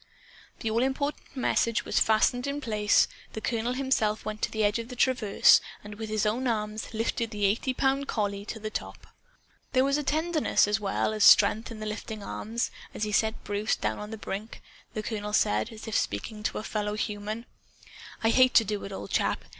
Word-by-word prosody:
The 220 - -1
all 230 +2 +2
important 270 +2 -2
message 230 -3 +1
was - - +1
fastened 245 +4 +3
in 280 +1 -2
place. 210 -6 +3 0.3
The - - -4
colonel 230 +2 -1
himself 250 -5 0
went 215 0 -5
to - - +1
the 220 -1 -1
edge 205 +2 +2
of 230 - -5
the 250 - -8
traverse, 245 -5 +5 0.2
and 210 0 -8
with 220 +1 -6
his 215 0 0
own 240 +5 0
arms 215 -1 -3
lifted 230 +1 -1
the 210 -2 -1
eighty 215 +6 +1
pound 270 +2 0
collie 200 -2 -2
to 220 - -6
the 215 0 -5
top. - - -6 0.7
There 255 0 +4
was 275 +2 +1
tenderness 315 -3 +2
as 210 +1 +1
well 205 +1 0
as 215 -1 +1
strength 220 +4 +6
in 225 -2 -8
the - - -4
lifting 215 0 -5
arms. 225 +4 -3 0.2
As - - -3
he 210 - -1
set 220 +2 +1
Bruce 205 +1 0
down 110 0 -2
on 210 - -6
the 220 - -6
brink, 210 +1 -6 0.3
the 215 - -2
colonel 210 -1 -4
said, 105 - +2
as 220 +1 -10
if 220 - -3
speaking 210 - -2
to - - -1
a - - -4
fellow 210 -1 -2
human: 215 +1 -4 0.8
"I 225 - +4
hate 255 0 +5
to 225 - +7
do 210 0 -3
it, 195 - -7
old 195 - -7
chap. - - 0
220 Hz, 205 wpm, -28 LUFS, 210-245 Hz, 0.8 s, to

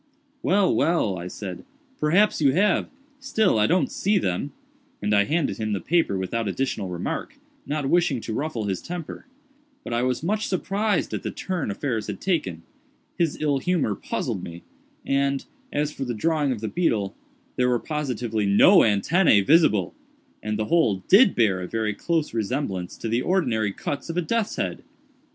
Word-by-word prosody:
"Well, 195 0 +3
well," 110 - +1
I 90 - -6
said, 95 0 -7 0.4
"perhaps 180 +6 +3
you 135 -3 +4
have—still 220 - 0
I 105 - +4
don't 180 +1 +1
see 205 +2 +1
them;" 95 - -1 0.5
and 105 +1 0
I 100 -1 +4
handed 160 +2 0
him 110 -1 -2
the 100 - -1
paper 165 - +1
without 105 +4 -2
additional 105 -2 -2
remark, 90 -1 -4 0.3
not 145 -1 -1
wishing 165 -4 +2
to 110 - -5
ruffle 125 -4 -2
his 95 -3 -2
temper; 175 - -7 0.6
but - - -5
I 120 - +1
was 125 +3 -1
much 215 +5 0
surprised 200 +1 -1
at - - -2
the - - -3
turn 180 - -3
affairs 110 0 -2
had - - -5
taken; 95 - -1 0.5
his 165 -4 0
ill 145 -3 +1
humor 170 - 0
puzzled - - -3
me—and, 135 +10 -3 0.3
as 145 +1 -1
for 140 - -5
the 120 -2 -3
drawing 150 +3 +1
of 115 -5 -3
the 110 - -2
beetle, 110 - 0 0.4
there 125 0 +2
were 125 - +3
positively 120 -7 -2
no 140 - +7
antennæ 105 - +4
visible, 135 - +4 0.5
and 105 0 -2
the 110 - -1
whole 105 - +2
did 200 +2 +6
bear 100 -6 +2
a 90 - -4
very 110 0 -1
close 165 +7 -1
resemblance 110 -5 -3
to - - -5
the 115 +2 +1
ordinary 120 - +1
cuts 140 +10 -5
of 165 - -3
a - - +3
death's 225 +5 -1
head. - - -3
135 Hz, 170 wpm, -24 LUFS, 105-170 Hz, 0.6 s, no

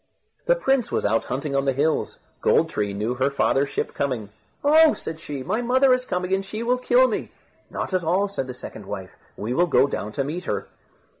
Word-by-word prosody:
The - - +5
prince 270 - +1
was - - 0
out 110 +2 +1
hunting 140 +3 -3
on 135 0 +1
the 135 - +2
hills. 150 +4 0 0.2
Gold - - +3
tree 105 -1 -1
knew 105 +4 -2
her 130 +2 +1
father's 140 0 +1
ship - - -3
coming. 125 -7 -2 0.3
"Oh!" 310 +2 +6
said 160 0 -7
she, 145 -4 -6
"my 215 - -1
mother 255 +2 +4
is 255 0 -1
coming, 180 +1 -1
and 195 0 +1
she 215 +3 -5
will 250 +2 +1
kill 250 +1 +4
me." 225 - -3 0.4
"Not - - -4
at 185 -2 +1
all," 185 +5 +2
said 165 -10 -4
the 125 - -6
second 110 -4 -9
wife; 95 -2 -6 0.3
"we 110 +4 -3
will 175 +6 +3
go 130 -5 +4
down 105 -6 -4
to 140 - -1
meet 165 +6 -4
her." - - -2
160 Hz, 220 wpm, -24 LUFS, -, 0.4 s, Oh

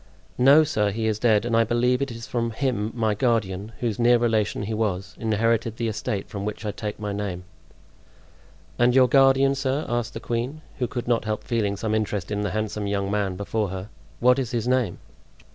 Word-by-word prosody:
"No, 140 +5 +7
sir, 105 -9 0
he 110 +2 -2
is 110 -1 0
dead; 110 -2 +3
and 120 -1 0
I 115 - +5
believe 125 +3 +1
it 140 - -1
is 115 -1 -7
from 120 -3 -1
him 115 -3 -1
my 110 -3 +1
guardian, 105 -3 0
whose 115 -3 -1
near 120 +1 +5
relation 110 -3 0
he 110 +2 -3
was, 95 -4 -2
inherited 115 +1 0
the 115 - -1
estate 105 -2 -3
from 100 -1 -6
which 105 +1 -5
I 105 - -1
take 105 0 -5
my 105 -1 -3
name." 100 -3 -4 1.4
"And 120 +1 +4
your 130 -1 +6
guardian, 135 +1 +5
sir," 135 +2 -1
asked 120 -1 -2
the - - -3
queen, 125 +7 -3 0.2
who 125 - 0
could 120 +1 -5
not 120 -2 +1
help 110 -1 -2
feeling 105 -4 -1
some 110 +1 -2
interest 105 -3 -1
in 105 0 -1
the 105 - -1
handsome 105 +1 -2
young 100 -1 -1
man 100 -3 0
before 100 +1 -2
her, 95 +2 -6 0.3
"what 125 +2 +4
is 130 -4 -2
his 120 -1 -2
name?" 125 -7 +1
110 Hz, 205 wpm, -24 LUFS, 105-120 Hz, 1.4 s, No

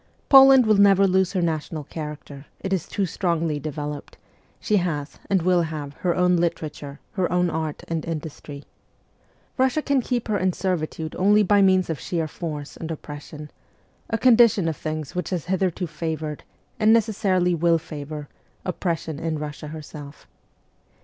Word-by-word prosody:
Poland 270 -2 +8
will 215 -1 +4
never 195 -1 +6
lose 190 0 +2
her 185 -3 0
national 160 -1 -2
character, 150 -2 -8
it 190 - -3
is 185 -4 -1
too 200 - -1
strongly 165 -4 -1
developed; 150 -1 -6 0.4
she 210 - +1
has, 155 -6 -3
and 190 -4 +2
will 180 -1 +3
have, 155 -3 -5
her 175 -2 0
own 180 0 +3
literature, 155 -4 -3
her 185 -3 -1
own 180 -1 +2
art 160 -2 -3
and 165 -2 -2
industry. 150 -3 -6 1.0
Russia 260 +3 +3
can 280 -2 +2
keep 245 -1 -2
her 210 -2 0
in 185 0 +1
servitude 160 -4 -3
only 205 +3 +5
by 205 +1 +4
means 185 -2 +4
of 160 -5 -3
sheer 165 +1 -2
force 150 -2 -6
and 165 - -7
oppression 150 -1 -8 0.6
a 225 - 0
condition 230 -7 +5
of 160 - -1
things 155 -1 -5
which 180 -2 -3
has 180 -5 -3
hitherto 185 -1 0
favoured, 155 -1 -4 0.4
and 215 0 +5
necessarily 200 -5 +2
will 170 0 +3
favour, 150 -1 -7 0.4
oppression 165 -4 -3
in 160 -1 -2
Russia 150 0 -6
herself. 150 -1 -10
170 Hz, 155 wpm, -24 LUFS, 155-190 Hz, 1.0 s, Poland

